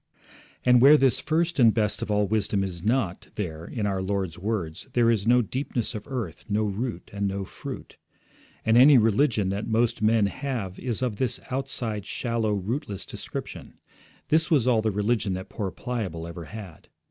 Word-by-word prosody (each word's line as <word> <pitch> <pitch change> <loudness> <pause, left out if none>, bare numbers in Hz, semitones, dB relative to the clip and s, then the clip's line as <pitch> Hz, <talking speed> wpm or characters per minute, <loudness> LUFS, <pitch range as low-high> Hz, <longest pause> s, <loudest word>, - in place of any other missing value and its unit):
And 125 -1 +6
where 145 +4 +9
this 135 -4 +3
first 165 +1 0
and 115 -3 +7
best 105 -2 0
of - - -4
all 105 0 +2
wisdom 100 -1 0
is 90 -3 -5
not, 110 -5 0
there, 80 -6 -4
in 110 +2 -3
our 95 -2 0
Lord's 95 -3 -2
words, 95 -3 -3
there 120 -1 +4
is 110 -2 0
no 125 +1 +5
deepness 125 0 -3
of 105 - -7
earth, 130 -5 -5
no 105 +1 +1
root, 110 +4 -3
and 100 0 -1
no 100 0 -3
fruit. - - -8 0.7
And 110 +1 +4
any 140 +2 +8
religion 110 -2 +3
that 100 +2 -3
most 115 0 +1
men 110 0 +4
have 100 -4 -4
is 125 -1 -2
of 120 -5 -1
this 125 -1 0
outside, 120 -6 -3
shallow, 115 -3 -1
rootless 100 0 -4
description. - - -7 0.5
This 160 +1 +3
was 145 -8 +3
all 120 -3 +3
the 110 - +1
religion 105 0 0
that 95 +1 -6
poor 100 -3 -3
Pliable 95 -8 -4
ever 85 0 -7
had. 100 -3 -10
110 Hz, 180 wpm, -26 LUFS, 100-125 Hz, 0.7 s, where